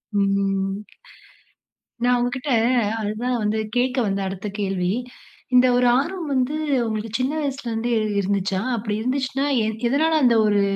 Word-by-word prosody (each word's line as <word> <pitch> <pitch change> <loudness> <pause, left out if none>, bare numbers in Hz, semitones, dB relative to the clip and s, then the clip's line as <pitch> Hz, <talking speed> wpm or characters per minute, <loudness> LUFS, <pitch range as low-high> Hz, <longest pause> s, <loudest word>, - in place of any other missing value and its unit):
ம். 195 -1 +1 1.3
நான் 245 0 +4
உங்கக்கிட்ட 250 +3 -2 0.5
அதுதான் 225 +4 -2
வந்து 215 +1 0 0.2
கேட்க 255 +1 +1
வந்தேன், 195 -1 -1
அடுத்த 195 +2 -6
கேள்வி. 190 -2 0 0.6
இந்த 250 +1 +7
ஒரு 245 0 +3
ஆர்வம் 330 +3 -2
வந்து, 260 +2 0 0.3
உங்களுக்கு 220 0 -3
சின்ன 255 +3 0
வயசுல 275 -4 -3
இருந்தே 230 +2 -1 0.3
இருந்துச்சா? 195 -1 -1
அப்பிடி 215 -1 -3
இருந்துச்சுன்னா, 265 +2 -1 0.2
எ - - 0 0.2
எதனால 315 +5 +2
அந்த 235 -2 +5
ஒரு 205 -1 +3
235 Hz, 135 wpm, -22 LUFS, 200-255 Hz, 1.3 s, இந்த